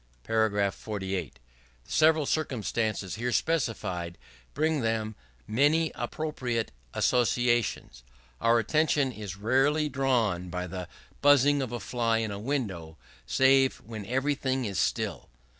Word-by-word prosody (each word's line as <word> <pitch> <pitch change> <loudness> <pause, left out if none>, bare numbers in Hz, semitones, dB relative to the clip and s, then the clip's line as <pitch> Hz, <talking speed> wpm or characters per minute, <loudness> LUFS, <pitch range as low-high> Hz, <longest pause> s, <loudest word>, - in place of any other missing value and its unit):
§ 105 -3 +1
48. 95 -7 -4 0.5
The - - -15
several 155 -1 +4
circumstances 110 - -1
here 125 0 0
specified 105 - -1 0.4
bring 155 +2 +1
with 135 - -2
them 110 -1 -1 0.3
many 150 +8 +2
appropriate 125 - -3 0.2
associations. 120 - +1 0.4
Our 115 +1 +4
attention 145 +3 +2
is 105 -5 -7
rarely 135 +8 +2
drawn 120 -10 0
by 90 +1 -3
the 90 0 -6 0.3
buzzing 145 0 +5
of 130 -3 -3
a 120 - -3
fly 115 -2 0
in 110 -2 -2
the 100 - -5
window, 100 - -3 0.3
save 135 0 +4
when 110 -2 -8
everything 130 0 0
is 100 -3 -2
still. - - -1
120 Hz, 125 wpm, -28 LUFS, 100-135 Hz, 0.5 s, buzzing